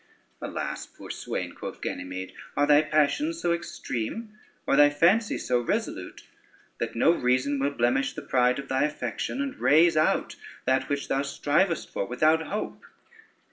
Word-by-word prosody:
"Alas, - - -4
poor - - -10
swain," - - -4
quoth - - -7
Ganymede, 90 +1 -5 0.2
"are 145 - +4
thy 145 0 +6
passions 155 - +1
so 170 - +1
extreme 170 - -4 0.3
or - - +2
thy 145 +1 +7
fancy 180 +9 +3
so 125 -1 0
resolute, 120 - -3 0.6
that - - -3
no 120 - +5
reason 130 -1 +1
will 140 +1 +1
blemish 130 0 +1
the - - -7
pride 125 -1 +2
of 140 0 -6
thy 130 0 +1
affection, 125 - -3
and 280 0 -6
rase 165 +3 +5
out 155 0 +1 0.3
that 130 +1 +1
which 140 -1 -2
thou 135 - +1
strivest 150 +5 0
for 100 - -2
without 155 +6 +3
hope?" 210 - -4
145 Hz, 155 wpm, -27 LUFS, 125-165 Hz, 0.6 s, thy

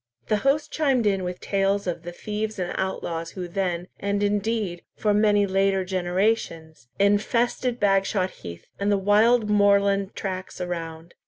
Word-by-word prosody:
The 215 - +3
host 275 +7 +1
chimed 270 -7 +1
in 195 -2 +1
with 180 0 -4
tales 195 0 0
of 175 -2 -3
the 175 +1 -7
thieves 210 +4 -4
and 180 -2 -3
outlaws 170 -3 -3
who 180 -1 -4
then, 175 -1 -2
and 200 0 -1
indeed 205 -3 -1
for 210 -1 +1
many 205 -1 +3
later 195 0 +1
generations, 175 - -1
infested 235 +5 +1
Bagshot 195 -2 +1
heath, 85 0 -9
and 200 +1 +1
the 200 - +3
wild 215 +4 +4
moorland 200 -1 +3
tracks 185 -1 -5
around. 165 -2 -5
195 Hz, 150 wpm, -24 LUFS, 180-210 Hz, -, wild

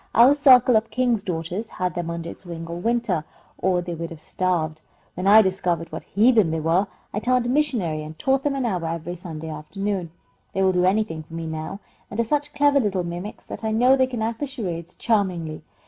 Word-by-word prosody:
"Our 245 +4 +8
circle 255 -4 +6
of 220 +1 +2
King's 245 -4 +1
Daughters 180 +4 -4
had 180 -2 -2
them 170 0 -3
under 170 0 -4
its - - -9
wing 170 -2 -7
all 170 +1 -6
winter, 230 -5 0 0.4
or 180 -1 +1
they 175 0 -4
would 165 0 -5
have 165 - -10
starved. 160 -3 -1 0.3
When 180 +2 -3
I 215 +2 +8
discovered 180 -3 -1
what - - -5
heathen 220 -3 +3
they 160 0 -1
were, 165 +5 +2 0.3
I 210 - 0
turned 250 +2 +1
missionary 240 - 0
and 155 +1 -9
taught 270 0 +1
them 285 0 0
an 265 -2 -1
hour 185 -7 -1
every 170 +1 -4
Sunday 160 -2 -7
afternoon. 185 +4 -3 0.4
They 190 - +1
will 190 - +4
do 180 0 +2
anything 190 -4 +1
for 155 +1 -11
me 165 0 -4
now, 160 +5 -5 0.3
and 205 - -6
are - - +4
such 290 +5 -1
clever 290 -1 +4
little 200 -7 0
mimics 175 +5 -6
that - - -8
I 220 - 0
know 245 +4 +5
they 260 -1 +3
can 240 -4 -3
act 225 0 -2
the 290 - -2
charades 175 - -5
charmingly. 180 -8 0
190 Hz, 215 wpm, -23 LUFS, 165-235 Hz, 0.4 s, Our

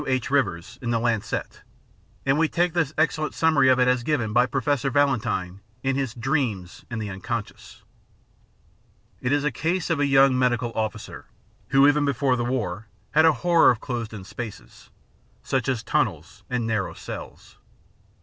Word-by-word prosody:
H. 130 -1 -1
Rivers 100 -10 -1
in 120 - -3
the 115 -1 +1
Lancet, 115 -2 -2 0.6
and 135 +2 +2
we 165 -1 +3
take 175 -1 +1
this 160 -5 0
excellent 155 -1 0
summary 150 -5 +4
of 130 - +5
it 125 - +4
as 125 -1 +2
given 120 -6 -1
by 125 +2 +4
Professor 135 +2 0
Valentine 120 -9 0 0.2
in 135 0 +1
his 135 -4 -2
Dreams 120 - -2
and 115 -2 -4
the 110 - -4
Unconscious. 105 +3 -6 1.4
It 125 - -1
is 145 0 +2
the 150 - +1
case 170 +8 -1
of 160 - +1
a 145 - +2
young 135 -1 +5
medical 120 -1 +1
officer, 110 -1 -4 0.4
who 135 +1 +5
even 145 0 +3
before 140 -2 +1
the 120 - -2
war 110 -5 -3 0.2
had 155 +2 +5
a 160 - +7
horror 170 -1 +6
of 120 - +2
closed 120 -3 -4
in 105 -4 -8
spaces, 110 +3 -9 0.5
such 135 0 -1
as 125 -4 -1
tunnels - - -1
and 125 -2 -1
narrow 110 -4 -2
cells. - - -9
130 Hz, 170 wpm, -24 LUFS, 115-145 Hz, 1.4 s, a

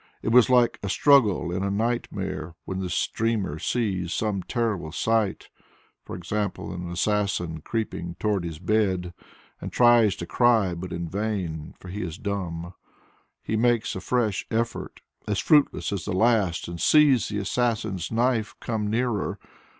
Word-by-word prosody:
It - - 0
was 125 +2 +6
like 125 -2 +4
a 100 - -3
struggle 110 -10 +4
in 90 +2 -2
a 100 - 0
nightmare 100 -6 -2
when 95 0 -4
the 90 -2 -3 0.2
dreamer 105 -9 -1
sees 95 -4 -1
some 105 -2 -1
terrible 105 -9 -2
sight, 110 +3 0 0.6
e.g., 90 +3 -5
an 90 -4 -3
assassin 90 -4 -1
creeping 85 -5 -4
towards 100 -5 0
his 80 -2 -6
bed, 95 -1 0 0.5
and - - -5
tries 120 -5 +5
to 85 - -6
cry 115 -4 +3
but 90 +1 -6
in 85 0 -3
vain, 90 -5 -3
for 90 - -12
he 100 +4 -5
is 85 -2 -5
dumb. 90 -4 -4 0.7
He 110 - -2
makes 120 0 +1
a 95 - -5
fresh 110 -3 0
effort 115 +1 -3 0.3
as 105 -2 0
fruitless 150 -3 +3
as 95 -5 -4
the - - -2
last 100 -4 +2
and 85 -1 -6
sees 140 - +5
the 105 - -3
assassin's 105 -3 -1
knife 115 -1 +1
come 110 -3 -2
nearer. 115 -2 -1
100 Hz, 150 wpm, -25 LUFS, 90-115 Hz, 0.7 s, was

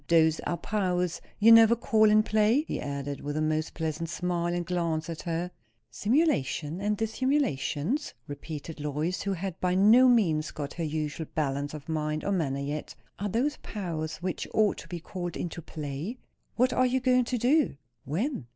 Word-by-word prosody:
Those 160 -1 +4
are 175 - -1
powers 180 -2 -1 0.2
you 225 +2 +6
never 230 0 +8
call 220 -2 +3
in 215 0 +5
play?" 215 +6 +3
he - - -4
added, 140 0 -4
with 145 +1 -3
a - - 0
most 155 0 -1
pleasant 160 0 -3
smile 175 0 -1
and 175 0 -2
glance 170 -2 -1
at 160 - -6
her. 170 +1 -3 0.4
"Simulation 200 - 0
and 210 +1 0
dissimulation?" 225 - 0 0.3
repeated 150 +2 -7
Lois, 150 +4 -2
who 200 - -1
had 185 -1 -5
by 180 0 +1
no 220 +7 +7
means 170 -11 +3
got 145 -2 -6
her 170 - -4
usual 155 0 -3
balance 145 -1 -1
of 145 -2 -10
mind 155 -1 -2
or 200 - 0
manner 155 -8 0
yet. 145 +2 -4 0.2
"Are 205 +1 -2
those 265 +9 0
powers 165 -6 -4
which 185 -1 -3
ought 215 -2 +3
to - - -10
be 175 - -5
called 175 0 -5
into 170 0 -4
play?" 155 - -5 0.4
"What 255 +2 +3
are 255 - +3
you 255 +1 +1
going 250 -1 +3
to 250 +1 -1
do?" 255 - +2 0.3
"When?" 170 - -2
175 Hz, 180 wpm, -28 LUFS, 155-215 Hz, 0.4 s, never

